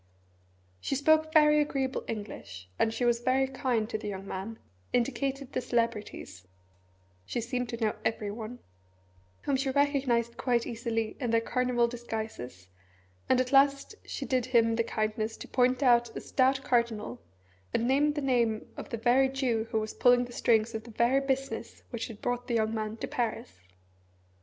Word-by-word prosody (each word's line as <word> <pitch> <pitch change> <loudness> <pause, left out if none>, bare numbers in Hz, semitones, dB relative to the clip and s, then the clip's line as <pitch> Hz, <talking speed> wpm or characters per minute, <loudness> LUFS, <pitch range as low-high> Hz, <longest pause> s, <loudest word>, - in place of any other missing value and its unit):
She 275 - -2
spoke 315 +3 +3
very 300 -1 +6
agreeable 270 -3 -1
English, 100 - -7
and 220 - +3
she 245 +2 -1
was 240 -1 +3
very 260 +2 +2
kind 255 -4 -1
to 220 - -2
the 210 - -6
young 195 -1 -5
man, 200 +5 -5 0.3
indicated 275 +2 -1
the - - 0
celebrities 215 - -2 0.8
she 100 - -3
seemed 245 +1 -2
to 235 - -4
know 220 -2 +1
everyone 220 +2 -3 0.9
whom 280 - +1
she 270 +1 0
recognised 265 -4 +1
quite 240 -2 +1
easily 225 -1 -2
in 245 -4 -2
their 230 0 +4
carnival 245 0 +1
disguises, 220 - -6 0.6
and 255 - +4
at 255 0 0
last 275 +5 +4
she - - -5
did 255 -3 0
him 230 -3 +3
the 230 - +2
kindness 215 0 -2
to - - -9
point 255 +1 +2
out 240 -2 +3
a - - -2
stout 265 0 +1
cardinal, 235 - 0 0.5
and 235 - 0
named 290 +3 +3
the 295 - -1
name 235 -5 +1
of - - -7
the 230 - -3
very 250 +4 +4
Jew 250 -4 0
who 220 - +1
was 215 0 -4
pulling 245 0 +4
the 245 - -11
strings 225 -1 +2
of 220 0 -4
the 235 - -12
very 240 +4 +2
business 270 0 -3
which 235 -2 -3
had 215 -2 -11
brought 245 0 -2
the 240 - 0
young 220 -1 +1
man 215 0 -3
to - - -4
Paris. 220 - -3
240 Hz, 170 wpm, -29 LUFS, 220-265 Hz, 0.9 s, very